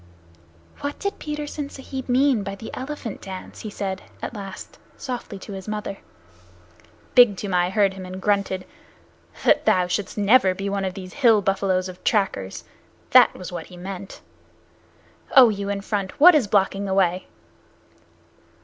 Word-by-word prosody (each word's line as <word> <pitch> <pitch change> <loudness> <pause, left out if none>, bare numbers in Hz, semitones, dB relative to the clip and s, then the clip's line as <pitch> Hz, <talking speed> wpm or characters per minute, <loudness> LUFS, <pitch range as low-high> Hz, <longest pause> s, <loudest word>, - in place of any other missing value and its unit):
"What 285 0 -4
did 400 -1 -4
Petersen 295 -1 -5
Sahib 265 -1 -7
mean 260 -2 +3
by 195 0 -5
the 220 +3 -9
elephant 260 -5 -6
dance?" 190 -1 -8
he 215 - -6
said, 195 -2 -4 0.2
at - - -5
last, 195 -3 -9 0.2
softly 245 -6 -6
to 195 - -10
his 190 0 -8
mother. 210 -2 -4 1.1
Big 245 -6 +7
Toomai 180 -3 0
heard 195 0 +2
him 190 -1 -8
and 185 +1 -7
grunted. 200 -2 0 0.8
"That - - +4
thou 180 -1 +4
shouldst 190 +4 -3
never 205 -2 +4
be 195 +1 -3
one 200 -1 -1
of 185 - -3
these 185 -1 -8
hill 230 -7 +4
buffaloes 190 -1 +1
of 180 -1 -11
trackers. 185 - 0 0.5
That - - +7
was 180 -1 -8
what 175 -2 -6
he 180 - -13
meant. 190 +1 -8 1.1
Oh, 255 -4 +9
you 200 -1 -3
in 200 0 -2
front, 195 +1 -3
what 355 +5 +9
is 285 -9 +3
blocking 195 0 +1
the 190 -1 -1
way?" 185 -1 +1
200 Hz, 160 wpm, -23 LUFS, 190-230 Hz, 1.1 s, Oh